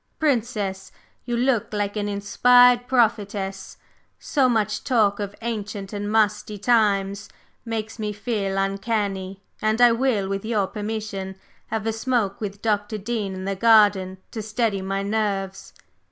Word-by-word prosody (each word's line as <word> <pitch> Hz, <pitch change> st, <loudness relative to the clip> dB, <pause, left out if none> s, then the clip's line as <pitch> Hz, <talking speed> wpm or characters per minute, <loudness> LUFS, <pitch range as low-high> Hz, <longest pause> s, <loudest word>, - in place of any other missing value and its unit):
Princess, 220 Hz, -, -1 dB, 0.3 s
you 240 Hz, -1 st, -1 dB
look 245 Hz, -3 st, +1 dB
like 205 Hz, 0 st, -1 dB
an 205 Hz, -1 st, -2 dB
inspired 245 Hz, +4 st, +4 dB
prophetess! 205 Hz, -6 st, 0 dB, 0.4 s
so 270 Hz, -4 st, +1 dB
much 215 Hz, -3 st, 0 dB
talk 215 Hz, -6 st, +2 dB
of 205 Hz, 0 st, -4 dB
ancient 210 Hz, -3 st, -4 dB
and 205 Hz, 0 st, -3 dB
musty 210 Hz, -1 st, +1 dB
times 200 Hz, -2 st, +1 dB, 0.4 s
makes 225 Hz, -1 st, -4 dB
me 210 Hz, -1 st, -2 dB
feel 205 Hz, -2 st, -2 dB
uncanny, 195 Hz, -1 st, -2 dB, 0.2 s
and 215 Hz, +1 st, +1 dB
I 245 Hz, -1 st, +7 dB
will, 230 Hz, -5 st, +1 dB
with 195 Hz, 0 st, -3 dB
your 215 Hz, -3 st, 0 dB
permission, 205 Hz, -1 st, -5 dB, 0.3 s
have 220 Hz, -1 st, -3 dB
a 225 Hz, -, 0 dB
smoke 225 Hz, -4 st, -1 dB
with 200 Hz, -1 st, -5 dB
Dr. 210 Hz, -1 st, 0 dB
Dean 210 Hz, -2 st, -3 dB
in 185 Hz, 0 st, -6 dB
the 195 Hz, 0 st, -1 dB
garden 205 Hz, -3 st, +4 dB
to 220 Hz, -, -5 dB
steady 215 Hz, -2 st, -1 dB
my 195 Hz, +1 st, -2 dB
nerves. 200 Hz, -2 st, -2 dB
210 Hz, 140 wpm, -23 LUFS, 195-225 Hz, 0.4 s, I